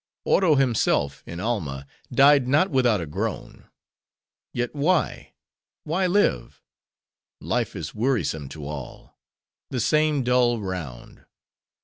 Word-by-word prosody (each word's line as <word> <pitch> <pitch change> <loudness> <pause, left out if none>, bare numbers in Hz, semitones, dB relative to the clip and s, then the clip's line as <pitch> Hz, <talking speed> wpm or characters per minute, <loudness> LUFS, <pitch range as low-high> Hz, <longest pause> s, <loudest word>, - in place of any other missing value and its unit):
Oro 175 -6 +4
himself, 115 - +1
in 85 - -7
Alma, 80 - -3 0.3
died 140 -2 +5
not 155 +8 +3
without 125 -6 +3
a 85 - -4
groan. 75 - -5 0.9
Yet 120 0 -3
why, 155 +4 0 0.5
why 185 +4 0
live? 180 - 0 0.8
Life - - -2
is - - -6
wearisome 105 - -1
to 75 -1 -9
all: 70 -3 -8 0.5
the 130 - -3
same 150 +2 +2
dull 125 -1 +2
round. 90 - -7
120 Hz, 110 wpm, -24 LUFS, -, 0.9 s, died